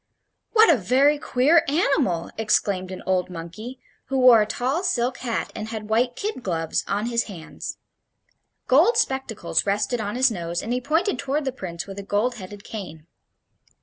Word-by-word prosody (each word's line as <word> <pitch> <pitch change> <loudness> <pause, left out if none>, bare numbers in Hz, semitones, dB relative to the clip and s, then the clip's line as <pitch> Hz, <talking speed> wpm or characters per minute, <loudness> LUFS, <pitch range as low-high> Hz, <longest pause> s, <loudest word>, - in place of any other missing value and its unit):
"What 445 0 +7
a - - +2
very 270 +8 +3
queer 290 +6 +3
animal!" 275 - +1
exclaimed 200 -4 0
an 185 - -7
old 185 -1 0
monkey, 185 +9 -8 0.3
who 270 - -2
wore 250 -3 +7
a 210 - 0
tall 265 - -1
silk 250 -8 0
hat 235 -3 -3
and 215 - -5
had 220 -1 -6
white 245 +2 +2
kid 415 -10 -4
gloves 165 -6 -1
on 205 +2 -1
his 235 0 0
hands. 175 -7 -8 0.9
Gold 325 - +4
spectacles 265 -6 0
rested 210 +4 0
on 205 +1 -3
his 255 0 +4
nose, 170 -3 -3
and 230 - -2
he 250 - -1
pointed 320 - 0
toward 280 +1 -1
the 265 - 0
Prince 175 -8 -6
with 195 0 -8
a - - -4
gold 215 +5 0
headed 200 0 -10
cane. 160 -8 -8
230 Hz, 175 wpm, -24 LUFS, 195-265 Hz, 0.9 s, What